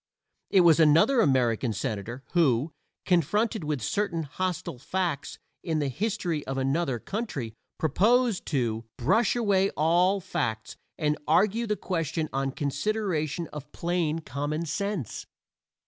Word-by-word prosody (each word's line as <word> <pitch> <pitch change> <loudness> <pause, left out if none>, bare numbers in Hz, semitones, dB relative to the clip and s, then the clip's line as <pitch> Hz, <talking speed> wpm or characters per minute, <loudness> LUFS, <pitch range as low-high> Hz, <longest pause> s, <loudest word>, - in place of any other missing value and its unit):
It 190 - +5
was 165 -2 +6
another 165 - +5
American 125 - +2
senator 115 +3 -4
who, 150 -3 +2 0.3
confronted 195 - +1
with 150 -6 -2
certain 200 - -1
hostile 160 -2 -3
facts 170 -2 -2 0.2
in 160 -3 -1
the 145 -2 0
history 180 - -2
of 135 0 -3
another 135 0 0
country, 140 - -4 0.2
proposed 215 - +2
"to 115 -6 -1
brush 210 - +2
away 200 -5 +2
all 175 +6 +3
facts, 115 - -3 0.2
and 150 -1 0
argue 215 +5 +3
the 210 - +1
question 165 -5 -2
on 135 0 0
consideration 160 +2 -1
of 150 -1 -8
plain 170 -2 -1
common 150 +3 -3
sense." 200 - -3
160 Hz, 125 wpm, -27 LUFS, 135-190 Hz, 0.3 s, was